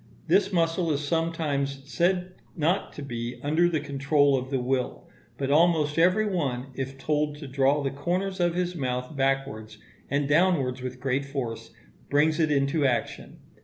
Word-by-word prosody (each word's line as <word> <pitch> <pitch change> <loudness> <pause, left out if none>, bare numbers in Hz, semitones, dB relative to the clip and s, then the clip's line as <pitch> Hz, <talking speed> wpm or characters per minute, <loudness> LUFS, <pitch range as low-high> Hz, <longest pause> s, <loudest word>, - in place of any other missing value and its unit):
This 190 +4 +3
muscle 165 -1 +1
is 145 0 -2
sometimes 145 -4 -1
said 180 +4 0 0.3
not 175 +5 0
to 145 - -7
be 120 -2 -5
under 160 +4 +3
the 160 -3 0
control 140 0 +2
of 130 0 -3
the 135 -1 0
will; 125 0 -2 0.3
but 135 0 -1
almost 155 -1 +3
every 185 +6 +4
one, 140 -10 -2
if 135 +1 -5
told 150 +1 0
to 145 -1 -8
draw 135 +2 +2
the 135 - -1
corners 185 +7 -2
of 175 -1 +1
his 180 0 -1
mouth 125 -1 -3
backwards 135 -6 -1 0.3
and 140 +1 0
downwards 145 -5 +2
with 125 0 -6
great 135 +1 0
force, 120 -5 -5 0.4
brings 150 +2 +3
it 160 -2 +3
into 140 +2 +1
action. 120 -4 -2
145 Hz, 165 wpm, -26 LUFS, 135-165 Hz, 0.4 s, every